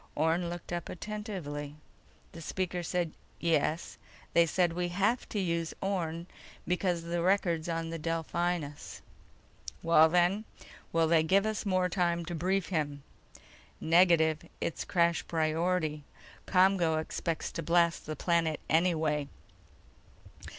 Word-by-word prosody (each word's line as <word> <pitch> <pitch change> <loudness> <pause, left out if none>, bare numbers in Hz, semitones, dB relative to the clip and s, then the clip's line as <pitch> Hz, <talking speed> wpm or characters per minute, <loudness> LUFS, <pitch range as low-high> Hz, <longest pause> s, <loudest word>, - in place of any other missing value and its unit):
Orne 165 +3 +1
looked 175 0 -6
up 175 -1 -4
attentively. 180 -8 -5 0.6
The 165 - -10
speaker 180 +1 -2
said: 175 -1 -1 0.3
"Yes. 160 -1 0 0.3
They 170 0 +5
said 175 0 +1
we 175 +1 -1
have 200 +7 0
to - - -4
use 170 -3 -1
Orne 170 -4 -2 0.4
because 180 -1 0
of 170 - -8
the 175 0 0
records 175 -3 +1
on 165 0 -2
the 165 - -4
Delphinus." 165 -1 -2 0.8
"Well 160 -1 +6
then, 180 +5 +2 0.5
will 165 -1 +3
they 160 0 +4
give 195 +6 +3
us 215 -1 -2
more 185 -1 +2
time 175 -2 0
to 175 - -5
brief 185 +3 0
him?" 145 -5 -2 0.8
"Negative. 165 -2 +4 0.2
It's 170 - -3
crash 170 -1 +2
priority. 160 -1 0 0.4
ComGO 180 -4 +3
expects 160 +1 -3
to 165 - -4
blast 170 +1 +2
the 155 - -3
planet 165 -3 +1
anyway." 160 -3 +1
170 Hz, 130 wpm, -30 LUFS, 160-180 Hz, 0.8 s, Well